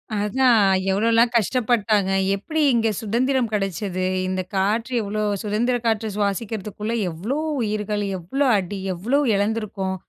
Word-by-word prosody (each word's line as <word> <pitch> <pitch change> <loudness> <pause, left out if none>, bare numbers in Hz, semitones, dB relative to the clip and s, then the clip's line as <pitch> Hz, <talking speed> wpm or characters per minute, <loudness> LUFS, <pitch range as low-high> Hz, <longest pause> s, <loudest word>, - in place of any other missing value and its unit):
அதான். 225 +3 +3 0.3
எவ்வளோல்லாம் 230 +4 +3
கஷ்டப்பட்டாங்க? 215 -3 +1 0.2
எப்படி 310 +11 -2
இங்க 225 -1 +2
சுதந்திரம் 240 +3 0
கிடைச்சது? 195 -2 -2 0.2
இந்த 185 0 -1
காற்று 215 +6 0
எவ்வளோ 215 0 -3 0.2
சுதந்திர 220 +4 0
காற்று 225 -1 +1
சுவாசிக்கிறதுக்குள்ள 210 +1 -3 0.2
எவ்வளோ 195 - -3 0.2
உயிர்கள்? 210 -1 -2
எவ்வளோ 265 +12 -1
அடி? 195 +1 -4
எவ்வளோ 235 +11 0 0.2
இழந்துருக்கோம்? 200 -2 -2
210 Hz, 115 wpm, -22 LUFS, 200-230 Hz, 0.3 s, அதான்